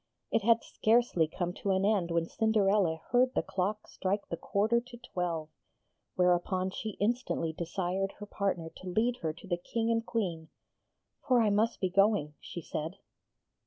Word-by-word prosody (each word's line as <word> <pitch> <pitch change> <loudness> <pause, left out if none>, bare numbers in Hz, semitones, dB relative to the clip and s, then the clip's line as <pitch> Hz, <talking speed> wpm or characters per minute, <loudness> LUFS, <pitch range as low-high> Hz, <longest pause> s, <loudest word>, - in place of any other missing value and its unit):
It - - +3
had 230 +2 +4
scarcely 220 -8 +2
come 175 +2 -3
to 200 - -1
an 190 0 +2
end 200 -5 +2
when 170 -1 +1
Cinderella 200 -7 +2
heard 250 +1 +3
the - - +2
clock 205 +3 -2
strike 195 +2 -2
the - - -1
quarter 215 +7 +1
to 240 0 -12
twelve; 175 -9 -3 0.7
whereupon 180 +1 +2
she 215 +1 -5
instantly 210 -7 0
desired 185 +3 -2
her 205 - -9
partner 190 -5 -2
to 185 - -7
lead 235 +6 +1
her 160 -9 -2
to 170 - -14
the 175 -2 0
King 225 +6 -1
and 230 0 +1
Queen. 175 -9 -2 0.8
'For 255 -2 +5
I 220 -3 +3
must 220 +3 +2
be 185 - 0
going,' 195 -6 +3
she 170 - -7
said. 160 +5 -4
195 Hz, 165 wpm, -31 LUFS, 175-220 Hz, 0.8 s, For